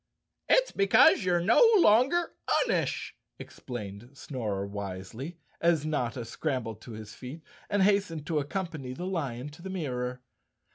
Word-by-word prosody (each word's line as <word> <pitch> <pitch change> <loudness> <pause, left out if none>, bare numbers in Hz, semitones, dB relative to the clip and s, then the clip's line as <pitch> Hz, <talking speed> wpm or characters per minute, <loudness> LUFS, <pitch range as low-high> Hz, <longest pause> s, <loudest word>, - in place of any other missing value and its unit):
"It's - - +4
because 220 +6 +5
you're 180 -1 +2
no 220 - +4 0.2
longer 275 - +4 0.3
unish," - - -1 0.3
explained 110 -2 -8
Snorer 105 -9 -3
wisely, 100 - -6 0.2
as 170 -3 +3
Notta 125 -6 -2
scrambled 115 -4 -3
to 120 - -10
his 110 -1 -9
feet 140 +6 -9 0.3
and 205 -2 +2
hastened 195 -6 +1
to 155 0 0
accompany 150 -4 -4
the 175 +8 -6
lion 145 -8 -3
to 150 +3 -14
the 190 - -7
mirror. 125 -8 -3
145 Hz, 135 wpm, -29 LUFS, 120-185 Hz, 0.3 s, because